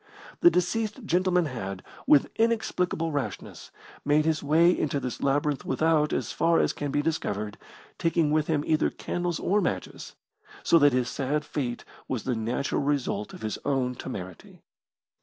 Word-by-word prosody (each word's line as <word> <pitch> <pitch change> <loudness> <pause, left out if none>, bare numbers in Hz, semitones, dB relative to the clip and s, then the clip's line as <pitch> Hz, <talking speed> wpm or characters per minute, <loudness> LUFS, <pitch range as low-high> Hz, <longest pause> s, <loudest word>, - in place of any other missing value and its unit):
The 345 - +7
deceased 220 - -1
gentleman 180 -1 +2
had, 100 -9 -5 0.2
with 145 -2 +5
inexplicable 180 -7 0
rashness, 145 -2 -5 0.3
made 150 +1 +3
his 160 -1 +1
way 165 +5 +4
into 145 -2 -1
this 125 -3 -5
labyrinth 145 0 +1
without, 155 +2 +2
as - - -2
far 165 0 +2
as - - +2
can 145 - -4
be 145 +1 0
discovered, 105 -10 -2 0.4
taking 165 -2 +2
with 155 0 +2
him 155 -3 +1
either 155 0 +2
candles 175 -2 -3
or 205 +2 +1
matches, - - -4 0.5
so 165 - +5
that 145 -2 +5
his 125 -1 +1
sad 145 +3 -2
fate 125 -5 -4 0.2
was 125 -5 -3
the 130 - -1
natural 115 +5 -1
result 140 -7 -1
of - - -11
his 110 - -3
own 130 -2 0
temerity. 95 -8 -8
150 Hz, 160 wpm, -27 LUFS, 130-165 Hz, 0.5 s, The